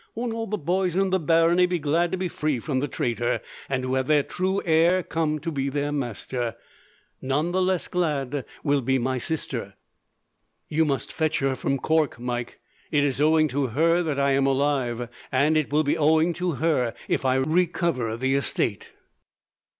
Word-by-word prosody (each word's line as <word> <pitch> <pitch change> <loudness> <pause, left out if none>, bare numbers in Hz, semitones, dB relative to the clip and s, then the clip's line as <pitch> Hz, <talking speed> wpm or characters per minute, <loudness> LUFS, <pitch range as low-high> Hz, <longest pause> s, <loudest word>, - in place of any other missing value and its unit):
Won't 235 0 -2
all 225 0 -3
the 210 - -2
boys 180 +1 0
in 195 0 +1
the 190 - +2
barony 165 +3 +4
be 180 0 0
glad 165 +3 +1
to 185 - -1
be 185 0 -1
free 155 -4 -1
from 130 +3 -2
the 145 - -1
traitor, 120 -2 -1 0.3
and 130 -2 -1
to 130 0 -2
have 130 0 0
the 150 -2 +4
true 190 +5 -1
heir 170 +2 +3
come 160 -2 -1
to 165 +3 -4
be 140 -2 -1
their 145 +1 -2
master. 120 -3 -3 0.7
None 145 +6 0
the 185 +1 +1
less 185 -1 0
glad 145 -6 -1 0.2
will 145 -2 +2
be 130 +2 +1
my 130 +1 -1
sister." 120 -8 -4 0.9
"You 160 +1 +2
must 135 -5 -2
fetch 160 -1 0
her 135 -1 +1
from 135 - -1
Cork, 155 -2 +1
Mike. 120 0 -4 0.3
It 145 -2 +2
is 140 -1 0
owing 155 +1 +4
to 140 0 0
her 165 +8 +2
that 155 -5 -2
I 140 0 +3
am 135 0 +2
alive, 135 -4 0 0.2
and 145 +4 +3
it 155 -3 0
will 150 +1 +3
be 145 - 0
owing 160 +3 +3
to 180 0 -2
her 140 -6 0
if - - 0
I 130 -1 +2
recover 150 -5 0
the 130 +2 0
estate. 120 -6 -1
145 Hz, 190 wpm, -25 LUFS, 130-165 Hz, 0.9 s, barony